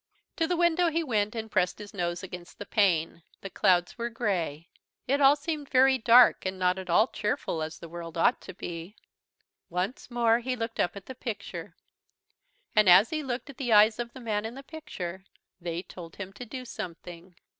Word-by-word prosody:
To 325 - +1
the 355 0 0
window 345 0 +3
he 330 +1 0
went, 215 -6 0
and 220 -1 -5
pressed 180 -2 +1
his 210 -1 -10
nose 175 -2 -2
against 180 -1 -9
the 205 - -7
pane. 175 -6 +1 0.2
The 195 - -7
clouds 180 +4 +2
were 235 0 -2
grey. 175 -9 -2 0.4
It 280 +3 +1
all 275 +1 +7
seemed 295 -1 -4
very 265 0 +5
dark 240 +2 +6
and 190 0 -3
not 180 0 +1
at 185 - -8
all 210 +6 +5
cheerful 190 -8 -2
as 155 0 -5
the 170 - -10
world 170 0 -8
ought 240 +9 +3
to 185 - -9
be. 175 +3 -7 0.7
Once 180 +10 -3
more 235 -1 +3
he 250 +1 -2
looked 230 -1 -5
up 175 - +1
at 200 - -9
the 260 - -7
picture. 235 -3 -6 1.0
And 215 -3 +6
as 185 +5 +7
he 310 -1 -1
looked 265 0 -4
at 270 - -20
the 245 -5 0
eyes 215 +2 +6
of 235 0 -4
the 260 - -10
man 215 -4 -2
in 225 +2 -6
the 275 - -9
picture, 200 - -7 0.4
they 170 0 -4
told 175 -2 -11
him 195 -1 -7
to 240 +4 -9
do 255 +3 -7
something. 175 -3 -8
210 Hz, 200 wpm, -28 LUFS, 180-250 Hz, 1.0 s, all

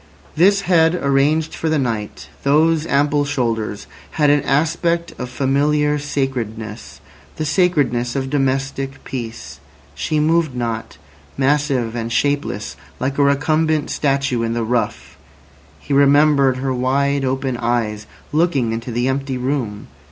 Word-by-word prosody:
This 195 +5 +4
head 165 -2 +3
arranged 150 +1 +1
for 160 - -2
the 155 - +2
night, 115 -6 -3
those 155 +3 +2
ample 145 +1 +2
shoulders, 115 -7 -2 0.3
had 150 -2 +3
an 145 0 +3
aspect 165 +4 0
of 125 - -4
familiar 145 +3 +1
sacredness—the 110 - -5
sacredness 145 -7 +1
of 135 -1 -2
domestic 135 -1 -1
peace. 120 -3 -7 0.3
She 155 - -1
moved 155 -2 +2
not, 115 -2 -4 0.4
massive 135 -4 +1
and 115 -1 -3
shapeless 140 -6 -1 0.2
like 135 +2 -2
a - - +5
recumbent 155 +2 +1
statue 135 -4 0
in 115 0 -1
the 115 0 -1
rough; 120 +1 -2 0.6
he 140 - -5
remembered 140 -1 +4
her 130 0 -1
wide 140 +2 +1
open 130 0 -1
eyes 115 -3 -1 0.2
looking 150 -7 +1
into 115 +2 -4
the 120 +2 0
empty 135 0 -2
room. 125 -5 -3
135 Hz, 130 wpm, -19 LUFS, 120-150 Hz, 0.6 s, a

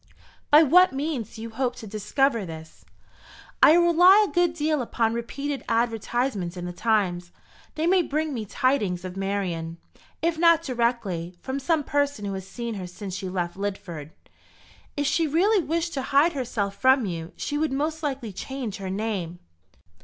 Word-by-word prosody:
"By 300 +2 +8
what 360 +3 +5
means 275 -6 -3
do 220 - -8
you 230 - -7
hope 245 +1 -1
to 225 - -9
discover 220 +4 0
this?" 160 -2 -10 0.8
"I - - +8
rely 350 +4 +6
a - - -9
good 350 -1 +2
deal 305 -2 0
upon 230 -1 0
repeated 275 +4 -4
advertisements 230 -4 -1
in 175 - -5
the 180 - -5
Times. 180 -4 0 0.4
They 310 - -1
may 365 +1 +4
bring 310 -1 -2
me 225 -4 -4
tidings 210 -8 0
of 185 0 -6
Marian 185 -4 -3 0.4
if 330 -1 0
not 335 -1 +5
directly, 235 - -1
from 265 +6 -4
some 300 +2 +1
person 285 -6 -1
who 200 - -3
has 190 -1 -6
seen 235 +1 -5
her 190 -3 -6
since 190 +2 -8
she 185 0 -4
left 175 -2 -3
Lidford." 190 -6 -5 0.9
"If 290 - 0
she 320 +3 +2
really 370 +6 +3
wished 335 +2 -2
to 270 - -2
hide 285 +5 +3
herself 225 -7 -2
from 260 +1 +4
you, 165 -3 -5
she 290 0 -3
would 315 -2 0
most 305 +4 -2
likely 265 -8 -3
change 250 0 -5
her 195 -1 -5
name." 190 -4 -3
240 Hz, 170 wpm, -25 LUFS, 195-295 Hz, 0.9 s, By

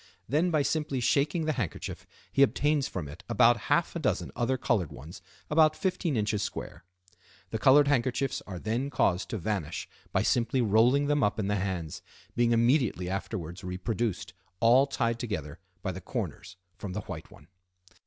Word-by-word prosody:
Then 155 +6 +2
by 155 -4 +2
simply 150 -2 -1
shaking 150 +6 +1
the 155 - +1
handkerchief 110 - -4 0.2
he 135 - +2
obtains 145 +1 +3
from 85 -6 -5
it 75 +5 -11
about - - +5
half - - +2
a - - -1
dozen - - -1
other 125 +2 0
colored 105 - 0
ones 75 +6 -10 0.3
about 155 0 +4
15 180 - -1
in. 105 - +1
square. 100 - -5 0.7
The 110 - -2
colored 140 +5 +6
handkerchiefs 130 -1 0
are 95 -3 -6
then 115 +8 -2
caused 90 -8 +1
to 110 - -2
vanish 90 -4 -3 0.2
by - - +1
simply 120 +2 +1
rolling 120 +5 +4
them 145 0 +2
up 105 -4 +1
in 100 -2 -1
the 105 - +1
hands, 90 -5 -3 0.3
being 120 0 +3
immediately 115 - +2
afterwards 95 -2 -5
reproduced, 100 +4 -3 0.3
all 125 +4 +5
tied 115 -4 -1
together 90 - -4 0.2
by - - -1
the - - -7
corners, - - -5 0.2
from 100 -3 -5
the - - -3
white - - -8
one. - - -17
115 Hz, 170 wpm, -29 LUFS, 95-140 Hz, 0.7 s, colored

